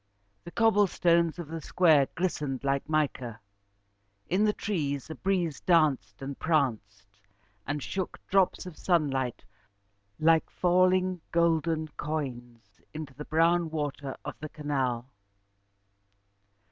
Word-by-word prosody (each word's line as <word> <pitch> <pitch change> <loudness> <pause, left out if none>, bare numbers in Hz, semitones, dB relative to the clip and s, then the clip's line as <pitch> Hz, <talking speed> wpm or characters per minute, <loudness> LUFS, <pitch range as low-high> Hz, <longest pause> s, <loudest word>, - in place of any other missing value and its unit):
The - - -7
cobble 215 -2 +4
stones 170 -2 +2
of 170 -4 -7
the 165 0 -5
square 155 -4 +4
glistened 150 -7 -2
like 140 +1 -1
mica. 130 -7 -1 0.9
In 195 +5 +3
the 210 - +4
trees, 150 -9 -3
a - - -3
breeze 175 -2 -1
danced 140 - +2
and 135 0 -6
pranced, 105 -10 -1 0.5
and 145 0 -2
shook 190 -2 -4
drops 195 -1 +2
of 180 -4 -10
sunlight 135 -8 0 0.8
like 160 0 +4
falling 185 0 +2
golden 165 -1 +1
coins 120 - -5
into 155 -3 -6
the 150 +2 -8
brown 165 +1 +2
water 145 -3 -4
of 145 - -6
the 155 - -6
canal. 135 -6 -2
155 Hz, 120 wpm, -28 LUFS, 135-170 Hz, 0.9 s, cobble